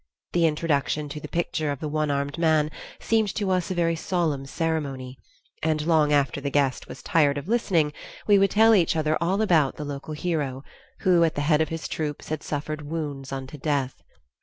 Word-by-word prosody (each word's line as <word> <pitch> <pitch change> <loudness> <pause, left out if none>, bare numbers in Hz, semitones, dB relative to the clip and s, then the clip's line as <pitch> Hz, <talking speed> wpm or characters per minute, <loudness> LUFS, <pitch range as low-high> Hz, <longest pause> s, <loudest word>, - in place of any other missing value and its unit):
The 170 -1 +4
introduction 150 -1 0
to 150 +1 -6
the - - -7
picture 160 -3 -1
of 140 - -4
the 155 - -3
one 155 0 -1
armed 140 +2 -2
man 155 -2 +3 0.3
seemed 220 -3 +1
to 200 -3 0
us 180 -2 0
a 185 - -2
very 165 -1 +1
solemn 160 -6 -1
ceremony, 140 -5 -3 0.4
and 155 -1 +1
long 155 -3 +3
after 140 -1 +2
the 140 - -2
guest 140 -2 0
was - - -10
tired 150 -7 +3
of 145 - -5
listening, 180 -10 +1 0.3
we 205 -2 +5
would 195 0 +4
tell 225 +3 +5
each 175 -6 +3
other 155 -1 +1
all 190 +5 +1
about 160 -9 +3
the 150 - -6
local 145 +2 -6
hero, 150 -5 -2 0.4
who 175 -2 +4
at 165 - +1
the 145 - -1
head 150 +1 +3
of 155 - 0
his 165 -1 -4
troops 150 -2 -4
had 155 -1 -2
suffered 150 +1 -4
wounds 145 -4 -4
unto 135 +2 -6
death. 140 -3 -1
155 Hz, 200 wpm, -25 LUFS, 145-170 Hz, 0.4 s, we